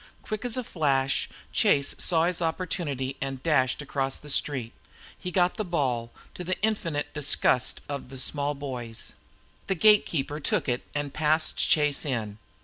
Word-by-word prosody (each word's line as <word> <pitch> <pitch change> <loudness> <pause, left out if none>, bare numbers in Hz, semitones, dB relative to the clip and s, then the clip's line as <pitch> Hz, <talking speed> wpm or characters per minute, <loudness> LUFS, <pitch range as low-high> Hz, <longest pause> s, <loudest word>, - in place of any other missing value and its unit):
Quick 215 0 -4
as 245 0 +2
a 255 - -1
flash 140 - +1 0.2
Chase 140 0 +3
saw 165 -2 +3
his 175 0 0
opportunity 160 -6 -2
and 135 -1 -4
dashed 135 -3 +2
across 135 -1 -1
the 150 - -7
street. 130 -5 -1 0.4
He 180 - -5
got 180 0 +2
the 215 - 0
ball, 130 - -1 0.2
to 180 - -6
the 185 +1 -2
infinite 170 -9 0
disgust 140 -4 +2
of 140 -3 -5
the 135 - -7
small 145 +2 -1
boys. 125 -5 -5 0.5
The 195 - +1
gatekeeper 165 -7 +4
took 145 - 0
it 125 -1 0
and 145 -1 -2
passed 155 +1 +2
Chase 150 -2 +3
in. 110 -7 -3
145 Hz, 155 wpm, -27 LUFS, 135-165 Hz, 0.5 s, gatekeeper